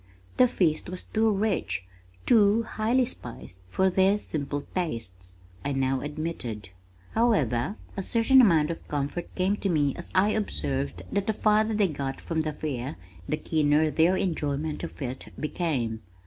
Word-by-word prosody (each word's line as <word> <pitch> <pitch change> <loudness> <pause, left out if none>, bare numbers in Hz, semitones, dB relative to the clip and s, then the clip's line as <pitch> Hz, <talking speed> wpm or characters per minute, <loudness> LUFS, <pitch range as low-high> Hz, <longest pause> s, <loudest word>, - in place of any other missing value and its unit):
"The 255 - +7
feast 165 -8 0
was 185 0 -4
too 220 0 +1
rich, 195 - 0 0.4
too 220 -1 +5
highly 230 +4 +1
spiced 120 - -6
for 190 - +2
their 190 +2 +4
simple 145 -6 -3
tastes," 95 - -4 0.3
I 140 - -1
now 135 0 +1
admitted. 145 - -4 0.4
However, 180 - +2 0.2
a 195 - -2
certain 235 +6 +5
amount 165 -8 +4
of 165 - -8
comfort 145 +4 -3
came 190 +2 +1
to 200 - -1
me 145 -5 +2
as 175 - -6
I 190 +3 +5
observed 75 - -2
that 200 - -1
the 220 - +2
farther 215 +1 +2
they 205 -2 +3
got 140 -4 -4
from 165 -1 -1
the 155 -1 -2
Fair 130 - -4 0.3
the 150 - +1
keener 155 0 +2
their 165 +6 +3
enjoyment 155 -3 -2
of 170 - -7
it 130 +1 -5
became! 135 -9 -2
160 Hz, 155 wpm, -27 LUFS, 135-200 Hz, 0.4 s, The